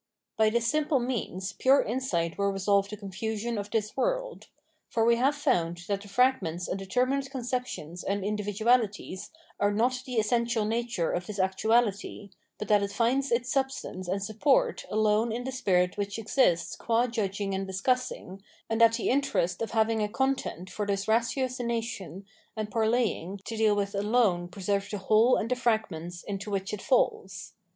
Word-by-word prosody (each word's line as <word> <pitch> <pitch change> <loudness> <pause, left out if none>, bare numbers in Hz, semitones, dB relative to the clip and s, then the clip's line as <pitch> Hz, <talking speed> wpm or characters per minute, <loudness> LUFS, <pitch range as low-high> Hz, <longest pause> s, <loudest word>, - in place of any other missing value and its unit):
By 220 0 +4
this 235 +1 0
simple 300 +3 +2
means 205 -6 -3
pure 270 +6 +4
insight 200 -9 -1
will 200 0 +1
resolve 195 +1 +1
the 210 - -6
confusion 220 +3 -3
of 205 0 -5
this 215 -1 -1
world. - - -2 0.4
For 225 -1 +1
we 235 0 +4
have 270 +4 +2
found 175 - 0
that 200 -1 -1
the 205 - -11
fragments 195 -7 +1
and 195 - -3
determinate 255 +7 0
conceptions 250 - -4
and 200 0 -1
individu 210 0 -3
alities 215 -6 +1 0.3
are 205 0 +3
not 245 +4 +1
the 250 - -4
essential 235 0 +1
nature 230 -5 -1
of 175 0 -3
this 210 - -6
actuahty, 200 +1 0 0.3
but 210 - -5
that 210 -1 +5
it 200 0 -2
finds 250 +5 +1
its 240 +1 +1
substance 265 -9 -2
and 190 +2 -1
support 220 +7 +1
alone 215 +1 +2
in 240 +2 -3
the 265 - -4
spirit 180 -8 +1
which 200 +1 -2
esists 205 - +1
qua 235 +1 +2
judging 200 -4 -2
and 195 0 -2
discussing, 195 -1 -2 0.3
and 225 +1 +1
that 230 0 +7
the 230 - -1
interest 230 -10 0
of 230 - -1
having 220 -1 +1
a 210 - 0
content 265 -7 -1
for 210 -1 -3
this 200 -1 -1
ratiocmation 230 - -1 0.3
and 215 -1 -3
parleying 220 -5 0
to 225 - -4
deal 215 -1 +3
with 200 0 -1
alone 200 -4 +2
preserves 195 +2 -2
the 205 - -3
whole 215 +5 +4
j^rtd 225 - -2
the 250 - +2
fragments 190 -8 -1
into 200 0 -5
which 195 -1 -2
it 210 - -4
falls. 215 -7 0
215 Hz, 170 wpm, -28 LUFS, 195-240 Hz, 0.4 s, that